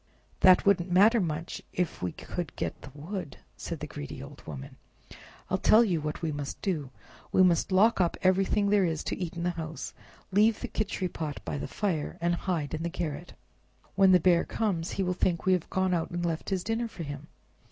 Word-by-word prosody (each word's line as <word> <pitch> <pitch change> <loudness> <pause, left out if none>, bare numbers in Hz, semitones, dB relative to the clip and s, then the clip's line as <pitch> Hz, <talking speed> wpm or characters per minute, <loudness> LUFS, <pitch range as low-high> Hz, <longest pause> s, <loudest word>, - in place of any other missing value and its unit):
"That 185 -1 +6
wouldn't 190 -3 +3
matter 215 +5 +6
much 165 -1 -3
if 180 -3 -2
we 90 - -1
could 175 -5 -6
get - - -4
the - - -10
wood," 170 +1 -6 0.2
said - - -6
the - - -2
greedy 70 - -7
old - - -11
woman. 70 -3 -8 0.7
"I'll - - 0
tell 225 +2 +6
you 175 -8 0
what 150 +2 -4
we 160 - 0
must 145 -1 -5
do—we 160 +1 -1
must 175 0 +3
lock 200 +3 +4
up 175 - +1
everything 195 +2 +3
there 205 -2 +4
is 165 -3 -1
to - - -2
eat 180 -2 -5
in 170 - -4
the 175 - +1
house, 160 -2 -6 0.4
leave 210 +3 +4
the - - -5
Khichri 190 -4 -2
pot 150 -3 -4
by 80 -5 -3
the 75 - -4
fire, 175 -8 -2
and 170 +1 +1
hide 170 -4 -2
in 160 - -2
the 170 - -1
garret. 170 -2 -5 0.6
When 195 -1 +5
the 180 - +7
Bear 175 0 +4
comes 185 -6 -1
he 195 - 0
will 180 0 0
think 175 -2 0
we 190 - +5
have 180 -2 -1
gone 190 -1 +1
out 165 -2 0
and 175 0 -3
left 165 -1 -2
his 190 -2 -1
dinner 225 +3 -1
for 190 -6 -8
him. 145 0 -7
175 Hz, 210 wpm, -29 LUFS, 160-190 Hz, 0.7 s, the